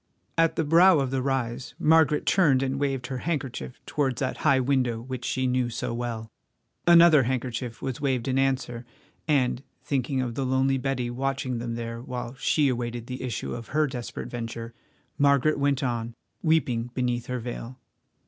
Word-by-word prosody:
At 165 Hz, 0 st, +3 dB
the 160 Hz, -, +1 dB
brow 170 Hz, +4 st, +6 dB
of 135 Hz, -2 st, -1 dB
the 135 Hz, -1 st, 0 dB
rise 130 Hz, -2 st, -2 dB
Margaret 155 Hz, -2 st, +4 dB
turned 145 Hz, -9 st, +4 dB
and 135 Hz, +1 st, -1 dB
waved 135 Hz, -3 st, -1 dB
her 130 Hz, -1 st, -4 dB
handkerchief 135 Hz, -6 st, -4 dB
towards 135 Hz, -4 st, -1 dB
that 130 Hz, -2 st, -2 dB
high 140 Hz, -5 st, +3 dB
window 125 Hz, -3 st, +1 dB
which 125 Hz, +1 st, -6 dB
she 130 Hz, +2 st, -1 dB
knew 125 Hz, -1 st, +1 dB
so 115 Hz, -, -3 dB
well. 115 Hz, -2 st, -4 dB, 0.6 s
Another 170 Hz, -3 st, +8 dB
handkerchief 125 Hz, -2 st, -3 dB
was 135 Hz, +1 st, -3 dB
waved 130 Hz, -3 st, 0 dB
in 130 Hz, 0 st, +1 dB
answer, 130 Hz, -3 st, 0 dB, 0.4 s
and, 130 Hz, -5 st, +2 dB, 0.2 s
thinking 135 Hz, -1 st, -1 dB
of 125 Hz, -2 st, -1 dB
the 135 Hz, -, -2 dB
lonely 130 Hz, +1 st, +2 dB
Betty 125 Hz, -2 st, -2 dB
watching 130 Hz, -1 st, -2 dB
them 115 Hz, 0 st, -4 dB
there 115 Hz, 0 st, -5 dB
while 125 Hz, -1 st, -5 dB
she 145 Hz, +2 st, +2 dB
awaited 120 Hz, -2 st, -2 dB
the 125 Hz, +1 st, -6 dB
issue 125 Hz, -3 st, -3 dB
of 115 Hz, -2 st, -7 dB
her 155 Hz, -, +4 dB
desperate 125 Hz, -4 st, -6 dB
venture, 115 Hz, -1 st, -5 dB, 0.5 s
Margaret 140 Hz, +1 st, +3 dB
went 140 Hz, -1 st, +1 dB
on, 120 Hz, -2 st, -2 dB, 0.3 s
weeping 125 Hz, -8 st, +1 dB
beneath 120 Hz, -2 st, -1 dB
her 125 Hz, -, -2 dB
veil. 120 Hz, +1 st, -6 dB
130 Hz, 170 wpm, -26 LUFS, 120-140 Hz, 0.6 s, Another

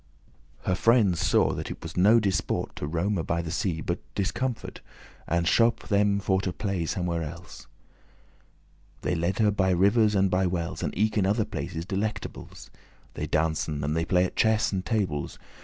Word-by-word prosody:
Her 95 Hz, -, 0 dB
friendes 100 Hz, -3 st, +3 dB
saw 85 Hz, -, +3 dB
that -, -, -5 dB
it -, -, -8 dB
was 80 Hz, -, -7 dB
no 105 Hz, +6 st, +6 dB
disport 100 Hz, -4 st, -1 dB
To 75 Hz, -, -3 dB
roame 85 Hz, +3 st, -1 dB
by 85 Hz, +1 st, -1 dB
the 80 Hz, -, -5 dB
sea, 85 Hz, -2 st, -1 dB
but -, -, -2 dB, 0.2 s
discomfort, 115 Hz, +4 st, -3 dB, 0.5 s
And 85 Hz, +1 st, 0 dB
shope* 115 Hz, +4 st, +2 dB
them 100 Hz, -1 st, +3 dB
for 95 Hz, -1 st, +1 dB
to 95 Hz, -, -2 dB
playe 95 Hz, -3 st, -2 dB
somewhere 85 Hz, -1 st, -1 dB
else. 80 Hz, +3 st, -9 dB
*arranged -, -, -33 dB
They -, -, 0 dB
leade 85 Hz, +3 st, -1 dB
her 105 Hz, -2 st, +3 dB
by 95 Hz, -2 st, +1 dB
rivers 100 Hz, +4 st, +3 dB
and 95 Hz, -1 st, +2 dB
by 95 Hz, 0 st, +2 dB
wells, 85 Hz, -2 st, -3 dB
And -, -, -1 dB
eke 110 Hz, +1 st, +2 dB
in 95 Hz, -, +2 dB
other 105 Hz, +2 st, +1 dB
places 85 Hz, -6 st, -5 dB
delectables; 105 Hz, +3 st, -5 dB, 0.4 s
They -, -, -4 dB
dancen, 75 Hz, -2 st, 0 dB
and 75 Hz, +2 st, -1 dB
they 80 Hz, -, +1 dB
play 90 Hz, +1 st, +2 dB
at -, -, -6 dB
chess 110 Hz, -1 st, +2 dB
and 95 Hz, -2 st, -2 dB
tables. 95 Hz, -, -2 dB
95 Hz, 180 wpm, -27 LUFS, 85-105 Hz, 0.5 s, no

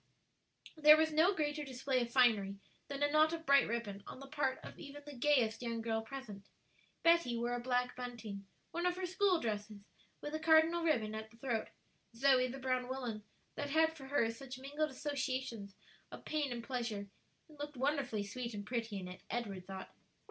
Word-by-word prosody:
There 305 Hz, -1 st, +8 dB
was 315 Hz, 0 st, +2 dB
no 320 Hz, +5 st, +5 dB
greater 300 Hz, -2 st, -1 dB
display 265 Hz, -1 st, -1 dB
of 240 Hz, -, -2 dB
finery 215 Hz, -6 st, +4 dB, 0.3 s
than 280 Hz, 0 st, -3 dB
a 290 Hz, -, +3 dB
knot 310 Hz, +1 st, +5 dB
of 330 Hz, -1 st, -5 dB
bright 280 Hz, -1 st, +6 dB
ribbon, 215 Hz, -4 st, -3 dB
on -, -, -8 dB
the 275 Hz, -, -8 dB
part 275 Hz, -2 st, 0 dB
of -, -, -10 dB
even 290 Hz, -1 st, -9 dB
the 295 Hz, -, -8 dB
gayest 245 Hz, -4 st, +2 dB
young 230 Hz, -1 st, -2 dB
girl 225 Hz, 0 st, -1 dB
present. 225 Hz, -5 st, -8 dB, 0.5 s
Betty 335 Hz, -8 st, +4 dB
wore 240 Hz, +1 st, -1 dB
a 245 Hz, -, -1 dB
black 250 Hz, 0 st, 0 dB
bunting 230 Hz, -6 st, -6 dB, 0.2 s
one 345 Hz, +1 st, 0 dB
of 355 Hz, -, +1 dB
her 370 Hz, 0 st, -2 dB
school 370 Hz, 0 st, +2 dB
dresses 210 Hz, -3 st, -4 dB, 0.3 s
with 295 Hz, -, -6 dB
a 310 Hz, -, -1 dB
cardinal 320 Hz, +1 st, +5 dB
ribbon 230 Hz, -10 st, +1 dB
at 220 Hz, 0 st, -5 dB
the 230 Hz, -, -19 dB
throat; 235 Hz, -3 st, -1 dB, 0.5 s
Zoe 255 Hz, 0 st, +4 dB
the 260 Hz, +2 st, -6 dB
brown 255 Hz, -1 st, 0 dB
woollen 245 Hz, -5 st, -4 dB, 0.3 s
that 285 Hz, -, -4 dB
had 320 Hz, +2 st, +3 dB
for 275 Hz, -4 st, -10 dB
her 250 Hz, -5 st, +2 dB
such 255 Hz, +2 st, -8 dB
mingled 290 Hz, +4 st, -2 dB
associations 260 Hz, -7 st, -3 dB, 0.4 s
of -, -, -10 dB
pain 300 Hz, -3 st, -1 dB
and 235 Hz, -1 st, -4 dB
pleasure, 230 Hz, -5 st, -3 dB, 0.4 s
and 300 Hz, -2 st, -17 dB
looked 295 Hz, -1 st, -6 dB
wonderfully 270 Hz, -6 st, 0 dB
sweet 235 Hz, +3 st, -5 dB
and 205 Hz, 0 st, -5 dB
pretty 230 Hz, -3 st, -2 dB
in 185 Hz, -, -6 dB
it, 180 Hz, +1 st, -9 dB
Edward 200 Hz, -6 st, -4 dB
thought. 190 Hz, -1 st, -7 dB
255 Hz, 190 wpm, -36 LUFS, 225-295 Hz, 0.5 s, There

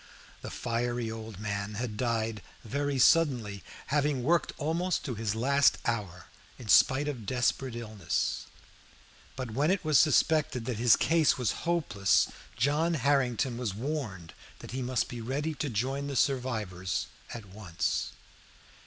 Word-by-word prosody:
The -, -, -6 dB
fiery 120 Hz, -1 st, -2 dB
old 110 Hz, -3 st, -8 dB
man 100 Hz, 0 st, -3 dB
had 115 Hz, -1 st, -3 dB
died 115 Hz, -2 st, -1 dB, 0.2 s
very 140 Hz, +4 st, -1 dB
suddenly, 125 Hz, -9 st, +3 dB, 0.3 s
having 145 Hz, -3 st, +1 dB
worked 165 Hz, +1 st, +2 dB
almost 170 Hz, +4 st, -1 dB
to 135 Hz, -, -2 dB
his 110 Hz, -1 st, -2 dB
last 140 Hz, +4 st, +3 dB
hour, 100 Hz, -7 st, -2 dB, 0.3 s
in 115 Hz, -4 st, -10 dB
spite 135 Hz, +6 st, +5 dB
of 120 Hz, -8 st, -5 dB
desperate 125 Hz, +1 st, 0 dB
illness; 110 Hz, -7 st, -2 dB, 0.9 s
but 130 Hz, -3 st, -5 dB
when 140 Hz, +8 st, +1 dB
it 190 Hz, -3 st, 0 dB
was 155 Hz, -5 st, +5 dB
suspected 150 Hz, -4 st, +3 dB
that 125 Hz, -3 st, -2 dB
his 120 Hz, -1 st, +6 dB
case 165 Hz, -2 st, +3 dB
was 125 Hz, -5 st, +1 dB, 0.2 s
hopeless, 105 Hz, -, +2 dB, 0.3 s
John 150 Hz, +7 st, +2 dB
Harrington 130 Hz, -3 st, +1 dB
was 110 Hz, -6 st, -2 dB
warned 110 Hz, -, -4 dB, 0.2 s
that -, -, -10 dB
he 130 Hz, +2 st, -3 dB
must 125 Hz, -1 st, 0 dB
be 120 Hz, -2 st, -7 dB
ready 145 Hz, +7 st, -2 dB
to 145 Hz, 0 st, -3 dB
join 135 Hz, +5 st, -2 dB
the 140 Hz, -, -4 dB
survivors 115 Hz, -10 st, -1 dB, 0.3 s
at 115 Hz, -3 st, -7 dB
once. 95 Hz, -3 st, -3 dB
125 Hz, 145 wpm, -29 LUFS, 110-140 Hz, 0.9 s, his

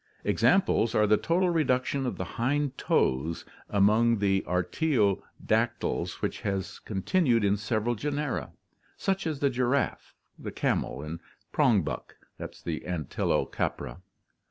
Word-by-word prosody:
Ex -, -, 0 dB
amples 120 Hz, -, +3 dB
are 105 Hz, -, +5 dB
the 105 Hz, +1 st, +5 dB
total 175 Hz, -, +1 dB
reduction 135 Hz, -3 st, +1 dB
of -, -, -3 dB
the -, -, -2 dB
hind 140 Hz, +3 st, -1 dB
toes 75 Hz, -, 0 dB, 0.2 s
among 110 Hz, +3 st, +4 dB
the 95 Hz, -1 st, +2 dB
artio 100 Hz, -, +1 dB, 0.2 s
dactyls 110 Hz, +1 st, 0 dB
which -, -, -2 dB
has 95 Hz, -3 st, -3 dB
continued 115 Hz, -, +1 dB
in 100 Hz, 0 st, +3 dB
several 110 Hz, +3 st, -1 dB
genera, 145 Hz, +3 st, -2 dB, 0.5 s
such 195 Hz, -2 st, -1 dB
as 150 Hz, -3 st, -3 dB
the 140 Hz, -, +4 dB
giraffe, 130 Hz, +2 st, -1 dB, 0.4 s
camel, -, -, -1 dB
and 80 Hz, +2 st, -6 dB, 0.3 s
prong -, -, +3 dB
buck -, -, -5 dB, 0.2 s
(Antilo 85 Hz, -6 st, -2 dB
capra). 90 Hz, -, -3 dB
115 Hz, 125 wpm, -28 LUFS, 100-140 Hz, 0.5 s, are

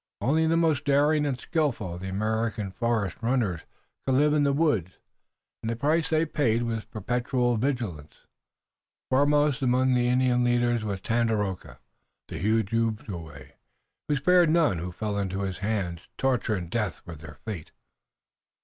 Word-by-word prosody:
Only 160 Hz, +5 st, +2 dB
the 165 Hz, +1 st, +2 dB
most 160 Hz, -4 st, +2 dB
daring 145 Hz, +1 st, +3 dB
and 130 Hz, -3 st, -2 dB
skillful 120 Hz, -, -1 dB
of 90 Hz, -, -8 dB
the 95 Hz, -, -4 dB
American 110 Hz, 0 st, -1 dB
forest 110 Hz, -4 st, -1 dB
runners 115 Hz, -8 st, 0 dB, 0.4 s
could 130 Hz, -, +1 dB
live 150 Hz, +2 st, +4 dB
in 150 Hz, -1 st, +3 dB
the 140 Hz, -, +3 dB
woods, 135 Hz, -, +1 dB, 0.7 s
and 110 Hz, -, -3 dB
the 115 Hz, -, -1 dB
price 150 Hz, +5 st, +1 dB
they 160 Hz, 0 st, +2 dB
paid 120 Hz, -7 st, +1 dB
was 115 Hz, -2 st, -3 dB
perpetual 120 Hz, +2 st, -1 dB
vigilance. 110 Hz, -, -3 dB, 0.9 s
Foremost 145 Hz, +1 st, +3 dB
among 130 Hz, 0 st, +2 dB
the 125 Hz, -1 st, +2 dB
Indian 125 Hz, 0 st, +2 dB
leaders 120 Hz, -1 st, +2 dB
was 100 Hz, -3 st, -3 dB
Tandakora, 110 Hz, -5 st, -1 dB, 0.5 s
the -, -, -5 dB
huge 110 Hz, +2 st, +1 dB
Ojibway, 100 Hz, -, -3 dB
and -, -, -27 dB, 0.5 s
he 145 Hz, -, +1 dB
spared 175 Hz, +4 st, +4 dB
none 155 Hz, -, +3 dB
who 90 Hz, +2 st, -5 dB
fell 105 Hz, +2 st, -3 dB
into 95 Hz, 0 st, -2 dB
his 95 Hz, -2 st, -3 dB
hands. 95 Hz, -5 st, -3 dB
Torture 125 Hz, -4 st, +1 dB
and 85 Hz, -3 st, -6 dB
death 105 Hz, -7 st, -2 dB
were 85 Hz, -, -8 dB
their 75 Hz, -2 st, -11 dB
fate. 100 Hz, -8 st, -6 dB
115 Hz, 160 wpm, -27 LUFS, 100-140 Hz, 0.9 s, live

